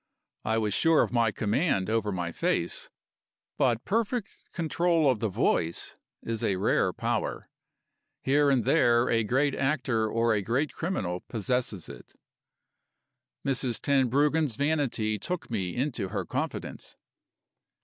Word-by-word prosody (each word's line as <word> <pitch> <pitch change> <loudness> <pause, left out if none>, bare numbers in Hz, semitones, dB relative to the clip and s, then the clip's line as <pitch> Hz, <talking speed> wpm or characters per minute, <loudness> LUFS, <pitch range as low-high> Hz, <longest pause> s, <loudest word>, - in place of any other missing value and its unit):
I 110 +1 0
was 105 -3 0
sure 165 +7 +4
of - - -3
my 115 -3 +2
command 105 - 0
over 110 -1 0
my 90 -3 -3
face; - - -1 0.7
but 120 -4 +2
perfect 225 +1 -2
control 170 -1 +1
of 120 - -2
the 110 0 0
voice 85 -2 0 0.3
is 115 -1 -3
a 95 - +1
rare 95 - +2
power. - - -2 0.8
Here 145 +2 +3
and 130 -4 +3
there, 120 +3 +3
a 115 -1 +3
great 135 +6 +1
actor 130 -6 0
or 115 +1 +2
a 105 - +1
great 130 +9 -1
criminal 95 - -2
possesses 115 -4 -2
it. - - -12 1.3
Mrs. 130 -3 0
Tenbruggen's 140 +1 +2
vanity 135 -7 0
took 165 - -5
me 95 -6 -2
into 125 -6 -1
her - - -3
confidence. - - -5
120 Hz, 130 wpm, -28 LUFS, 110-145 Hz, 1.3 s, sure